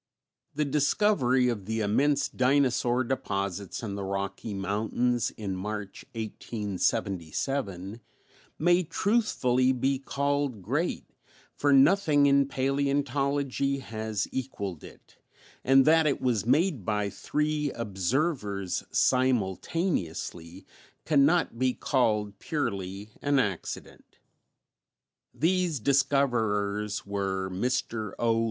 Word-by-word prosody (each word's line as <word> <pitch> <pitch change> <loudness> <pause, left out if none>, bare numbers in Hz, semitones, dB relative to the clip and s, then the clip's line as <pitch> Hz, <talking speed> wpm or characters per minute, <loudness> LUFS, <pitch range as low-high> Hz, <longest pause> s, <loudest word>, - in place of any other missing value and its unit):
The 150 +1 +1
discovery 140 -3 +2
of 110 -6 -2
the 110 +2 -2
immense 140 +8 +2
dinosaur 130 -2 +2
deposits 100 -6 -3
in 105 -3 -4
the 100 0 -4
Rocky 100 +2 -4
Mountains 110 +5 0
in 100 -3 -3
March, 105 +1 -5
1877, 100 - -3 0.6
may 175 +3 +4
truthfully 140 - +1
be 130 +1 0
called 140 -5 -1
great, 145 - -1 0.5
for 145 - +1
nothing 145 +1 +5
in 140 -1 +4
paleontology 140 0 0
has 110 -5 -3
equalled 100 - -4
it, - - -15 0.5
and 135 0 +5
that 160 0 +5
it 140 - +1
was 115 -4 0
made 155 - +2
by 105 0 -1
three 150 +6 -1
observers 105 - -1
simultaneously 95 - 0 0.4
can 140 -3 +5
not 160 -7 +1
be 130 -1 +1
called 105 -6 0
purely 100 - -3
an 145 -1 +2
accident. 105 -9 -4 1.1
These 175 -2 +1
discoverers 110 -7 +1
were 95 -1 -2
Mr. 110 0 -2
O. 115 -1 +2
125 Hz, 100 wpm, -28 LUFS, 100-140 Hz, 1.1 s, nothing